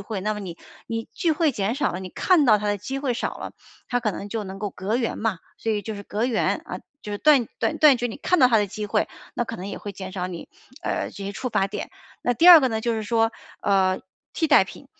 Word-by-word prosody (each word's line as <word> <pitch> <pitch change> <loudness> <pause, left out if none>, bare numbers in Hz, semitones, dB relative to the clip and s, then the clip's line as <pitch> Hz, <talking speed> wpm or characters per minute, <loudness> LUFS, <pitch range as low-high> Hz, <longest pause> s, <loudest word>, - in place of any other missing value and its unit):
会， 200 0 -5
那 215 +3 -1
么 210 - -6
你 180 -4 -7 0.3
你 225 0 -3
聚 345 - 0
会 310 -1 +2
减 210 0 -1
少 285 -1 0
了， 180 - -4
你 190 - -6
看 340 - +3
到 215 -5 +5
它 210 - -4
的 205 0 0
机 265 +8 -4
会 270 -3 -1
少 - - -3
了， - - -7 0.4
它 245 0 0
可 220 -3 0
能 200 - -6
就 220 +1 -3
能 190 0 -7
够 205 0 -3
隔 195 +5 -2
缘 240 -2 -2
嘛， 215 -5 -1 0.2
所 225 - -2
以 210 -1 0
就 220 - -5
是 200 - -7
隔 210 +3 -2
缘 240 -3 0
啊， - - -6 0.2
就 210 - -7
是 205 - -3
断 280 -4 +5
断 310 - 0
断 300 -4 +7
绝 245 - 0
你 225 - -6
看 360 - +1
到 260 - +7
它 235 - +4
的 205 - +1
机 210 +2 -5
会， 205 - 0 0.3
那 - - 0
可 230 - -6
能 185 - -7
也 - - -5
会 205 - -6
减 190 -1 -8
少 180 -1 -3
你， 175 -2 -8 0.3
呃， - - -2
这 200 - -8
些 200 - -4
触 255 +6 -4
发 195 -4 +1
点。 - - -6 0.3
那 245 - +2
第 325 +9 +3
二 340 -3 +12
个 260 - +2
呢 220 -2 -2
就 235 +1 0
是 220 - -2
说， 225 +1 +1 0.3
呃， 190 -2 +2 0.3
替 320 - 0
代 - - +6
品。 - - -12
220 Hz, 295 characters per minute, -24 LUFS, 200-245 Hz, 0.4 s, 二